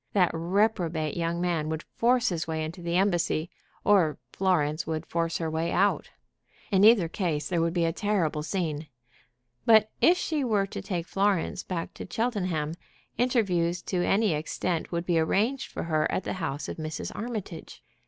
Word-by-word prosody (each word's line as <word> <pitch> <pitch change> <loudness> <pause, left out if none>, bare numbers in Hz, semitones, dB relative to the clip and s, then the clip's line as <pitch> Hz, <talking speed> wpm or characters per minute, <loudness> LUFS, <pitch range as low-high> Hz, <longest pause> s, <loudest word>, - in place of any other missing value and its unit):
That 180 -4 +4
reprobate 170 -3 0
young 170 0 -1
man 170 -3 0
would 160 0 -3
force 245 +1 +2
his 170 -2 -3
way 160 -1 -2
into 170 +3 -7
the 170 0 -2
embassy, 175 -3 +1 0.3
or 180 -7 +4 0.2
Florence 160 -5 +1
would 160 0 -2
force 165 -1 -1
her 165 - -2
way 160 +2 -1
out. 200 +2 +2 0.6
In 195 -1 +4
either 215 -5 +7
case 165 -4 -2
there 175 -3 0
would 165 +1 0
be 170 -1 +2
a 165 - 0
terrible 180 -6 0
scene. 155 -2 -2 0.8
But 220 -1 +5
if 355 +2 +6
she 310 -5 -1
were 210 -5 +2
to 195 - -6
take 175 -4 -3
Florence 195 -2 0
back 170 -3 -4
to - - -8
Cheltenham, 185 -9 -1 0.5
interviews 180 -9 +1
to 180 -2 -1
any 205 -1 +2
extent 160 +2 -2
would 170 0 -2
be 175 -2 +2
arranged 220 +11 0
for - - -4
her 155 -2 +1
at - - -1
the - - -3
house 145 -3 -3
of - - -6
Mrs. 155 -1 -4
Armitage. 210 -7 -6
175 Hz, 175 wpm, -27 LUFS, 160-200 Hz, 0.8 s, either